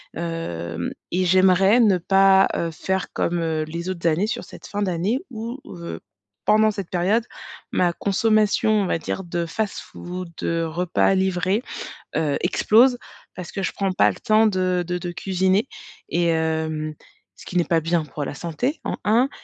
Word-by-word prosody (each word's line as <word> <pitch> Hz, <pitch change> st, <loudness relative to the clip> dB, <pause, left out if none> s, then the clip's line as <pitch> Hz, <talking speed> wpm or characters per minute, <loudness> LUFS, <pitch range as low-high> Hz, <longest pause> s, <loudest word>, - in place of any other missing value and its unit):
Hem, 85 Hz, -, -4 dB, 0.2 s
et 185 Hz, +1 st, +1 dB
j'aimerais 190 Hz, +4 st, +5 dB
ne 205 Hz, -6 st, +5 dB
pas, 195 Hz, +2 st, +5 dB
heu, 165 Hz, -, -1 dB
faire 190 Hz, +3 st, -2 dB
comme, 175 Hz, 0 st, 0 dB
heu, 160 Hz, -1 st, -1 dB
les 170 Hz, +3 st, -5 dB
autres 170 Hz, -2 st, -2 dB
années 170 Hz, +6 st, +2 dB
sur -, -, -3 dB
cette -, -, -12 dB
fin 205 Hz, -, -3 dB
d'année 190 Hz, +5 st, 0 dB
ou 230 Hz, +2 st, -5 dB
heu, 170 Hz, -1 st, -7 dB, 0.5 s
pendant 215 Hz, 0 st, +4 dB
cette 200 Hz, -4 st, -6 dB
période, 195 Hz, +6 st, +1 dB, 0.5 s
ma 175 Hz, -1 st, +3 dB
consommation, 215 Hz, +3 st, +2 dB
on 210 Hz, -2 st, +3 dB
va 180 Hz, -, 0 dB
dire 190 Hz, -, -4 dB
de 170 Hz, 0 st, -2 dB
fast-food, 180 Hz, -1 st, -5 dB
de 165 Hz, 0 st, -1 dB
repas 175 Hz, +3 st, +1 dB
livré, 190 Hz, +3 st, +1 dB, 0.6 s
heu, 150 Hz, -3 st, +1 dB
explose 245 Hz, +3 st, +4 dB, 0.4 s
parce 180 Hz, -2 st, -7 dB
que 195 Hz, -, -3 dB
je -, -, -1 dB
prends 195 Hz, -1 st, -1 dB
pas -, -, +4 dB
le -, -, -7 dB
temps 220 Hz, -1 st, +3 dB
de 185 Hz, -3 st, +1 dB
de 180 Hz, 0 st, -2 dB
de 175 Hz, 0 st, -5 dB
cuisiner 190 Hz, +5 st, +1 dB, 0.4 s
et 170 Hz, 0 st, +1 dB
hem, 160 Hz, -1 st, -1 dB, 0.4 s
ce -, -, -14 dB
qui 180 Hz, -, -5 dB
n'est 175 Hz, -, +4 dB
pas 165 Hz, -1 st, +2 dB
bien 165 Hz, 0 st, 0 dB
pour 150 Hz, 0 st, -5 dB
la -, -, -5 dB
santé 175 Hz, -, -3 dB
en -, -, -3 dB
1 235 Hz, +6 st, +3 dB
180 Hz, 175 wpm, -23 LUFS, 165-205 Hz, 0.6 s, j'aimerais